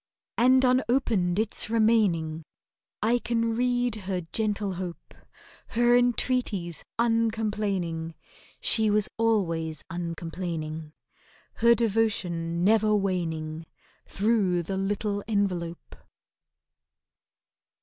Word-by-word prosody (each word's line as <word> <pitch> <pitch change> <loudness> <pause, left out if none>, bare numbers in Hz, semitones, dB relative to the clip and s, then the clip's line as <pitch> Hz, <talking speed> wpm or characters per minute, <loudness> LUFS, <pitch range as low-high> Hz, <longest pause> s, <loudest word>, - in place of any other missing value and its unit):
And 255 +2 +4
unopened 235 -7 +2
it's 215 0 +1
remaining! 205 -9 +2 0.6
I 235 +3 +3
can 230 -1 -1
read 245 0 +1
her 185 -2 -1
gentle 210 -3 -1
hope— 180 -1 -7 0.6
Her 240 0 +5
entreaties, 245 -8 0
uncomplaining 210 -8 -1 0.4
(She 220 -1 +2
was 210 -1 +3
always 165 -9 0
uncomplaining), 165 -2 -5 0.6
Her 235 +1 +5
devotion 190 -7 0
never 215 +1 +4
waning— 165 -5 -2 0.4
Through 195 -4 +1
the 190 +4 -4
little 205 +1 -2
envelope! 180 -6 -2
205 Hz, 85 wpm, -27 LUFS, 170-225 Hz, 0.6 s, Her